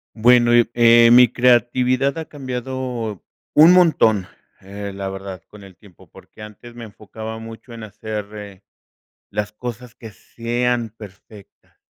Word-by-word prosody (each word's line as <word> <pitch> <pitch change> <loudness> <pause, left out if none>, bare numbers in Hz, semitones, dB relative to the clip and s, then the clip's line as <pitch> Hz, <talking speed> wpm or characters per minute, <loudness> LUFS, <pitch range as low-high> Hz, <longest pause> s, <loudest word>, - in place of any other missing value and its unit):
Bueno, 120 +1 +4
eh 120 -1 +4
eh, 115 0 +6
mi 125 0 +7
creatividad 125 +2 +2
ha 160 - -6
cambiado 125 - -6 0.3
un 160 +3 +8
montón, 115 - +3 0.3
eh, 100 +1 -8
la 95 0 -5
verdad, 95 -2 -8
con 105 -1 -15
el 95 -2 -15
tiempo, 100 -6 -20
porque 105 - -16
antes 120 +3 -13
me 120 - -10
enfocaba 110 +1 -9
mucho 115 +2 -12
en 115 - -10
hacer, 105 0 -7
eh, 100 -2 -11 0.7
las 105 0 -4
cosas 120 +1 -8
que 115 - -12
sean 120 +1 -3
perfectas, 100 0 -16
115 Hz, 140 wpm, -20 LUFS, 105-125 Hz, 0.7 s, un